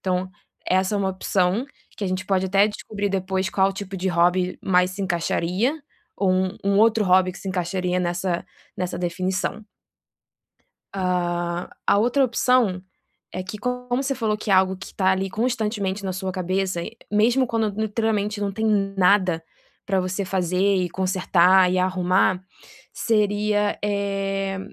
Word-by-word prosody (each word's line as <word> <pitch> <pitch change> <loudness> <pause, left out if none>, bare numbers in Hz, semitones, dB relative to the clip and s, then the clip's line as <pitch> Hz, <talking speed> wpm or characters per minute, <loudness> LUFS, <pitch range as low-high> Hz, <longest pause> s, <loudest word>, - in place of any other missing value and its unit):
Então, 185 0 -1 0.4
essa 190 +2 +1
é - - +1
uma 195 -1 0
opção 190 +4 0 0.3
que 205 - -4
a - - 0
gente 185 +1 -3
pode 190 -1 +1
até 200 +2 +4
descobrir 205 -1 -4
depois 190 0 -1
qual 195 0 +2
tipo 195 0 -6
de 190 +1 -1
hobby 180 +1 +2
mais 180 -1 +3
se 200 - -7
encaixaria, 185 - 0 0.4
ou 195 -2 +1
um 185 0 0
um 200 0 +2
outro 220 -1 +4
hobby 185 0 +4
que - - -11
se 195 - -7
encaixaria 180 0 -1
nessa 175 0 -1 0.3
nessa 180 -1 -3
definição. 185 +4 -2 1.3
Ah, 175 -2 -1 0.2
a - - +5
outra 245 +5 +3
opção 235 -6 +2 0.5
é 185 - -4
que 185 +3 -7
como 250 +2 -3 0.2
você 275 - 0
falou 220 -5 -1
que 215 - -3
é - - +6
algo 190 0 +4
que 190 - -11
tá 190 -1 +2
ali 190 0 -1
constantemente 210 -4 -1
na 190 - -2
sua 190 0 -3
cabeça, 185 -1 -1 0.3
mesmo 235 +5 +3
quando 225 -2 0
literalmente 210 -1 -1
não 200 - -1
tem 220 +3 -2 0.3
nada 185 -3 +3 0.4
pra 195 -1 +1
você 185 +2 -2
fazer 180 -1 -1 0.2
e 180 -2 0
consertar 185 0 +3
e 185 - +1
arrumar, 185 0 +1 0.5
seria, 210 -1 +1
eh, 195 -1 -1
190 Hz, 155 wpm, -23 LUFS, 185-205 Hz, 1.3 s, é